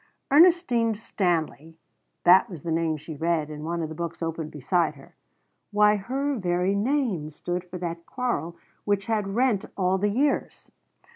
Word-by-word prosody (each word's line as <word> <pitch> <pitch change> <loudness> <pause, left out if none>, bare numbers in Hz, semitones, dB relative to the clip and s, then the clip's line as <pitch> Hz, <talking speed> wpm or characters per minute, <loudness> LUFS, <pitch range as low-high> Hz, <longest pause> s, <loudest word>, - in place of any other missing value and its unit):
_" - - +4
Ernestine 290 -10 +5
Stanley 165 - -2 0.5
that 180 +2 +6
was 170 -7 -9
the 170 - -3
name 160 -1 0
she 155 +2 -8
read 160 0 -1
in 150 0 -7
one 170 +1 -2
of 155 - -4
her - - -6
books 170 +1 -5
open 165 -1 -3
beside 155 +3 0
her. 135 - -16 0.6
Why 210 0 +4
her 270 +7 -2
very 180 +1 +1
name 210 - 0
stood 175 +4 -4
for 180 0 -8
that 170 -1 -5
quarrel 235 - -3 0.3
which 200 -1 0
had 210 -3 -1
rent 240 -5 +2
all 190 0 +1
the 205 +2 +1
years! 275 +7 -1
180 Hz, 165 wpm, -26 LUFS, 165-215 Hz, 0.6 s, that